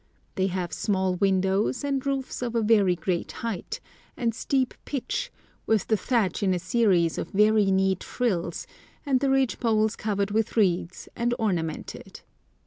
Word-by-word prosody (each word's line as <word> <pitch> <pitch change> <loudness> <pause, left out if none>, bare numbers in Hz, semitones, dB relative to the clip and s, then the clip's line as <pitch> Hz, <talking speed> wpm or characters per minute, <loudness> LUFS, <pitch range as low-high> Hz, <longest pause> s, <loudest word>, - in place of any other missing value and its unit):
They 190 -1 +1
have 180 -2 -3
small 190 -2 0
windows, 195 +5 +1
and 275 -2 -1
roofs 275 -2 -2
of 240 -1 -3
a 230 - +2
very 205 -4 +4
great 175 +1 -2
height, 230 - -4 0.4
and 230 -2 0
steep 260 +2 0
pitch, 400 - -3 0.4
with 220 -2 +2
the 220 - +4
thatch 215 -2 0
in 190 -2 +2
a - - 0
series 180 -3 +2
of - - -4
very 210 0 +4
neat 190 -1 +2
frills, 180 -9 -2 0.4
and 270 -3 +2
the 275 +1 +1
ridge 270 -2 +2
poles 220 -2 +2
covered 200 -1 -1
with 220 +2 0
reeds, 180 -4 +1
and 240 +1 0
ornamented. 175 -7 -3
210 Hz, 155 wpm, -26 LUFS, 185-240 Hz, 0.4 s, very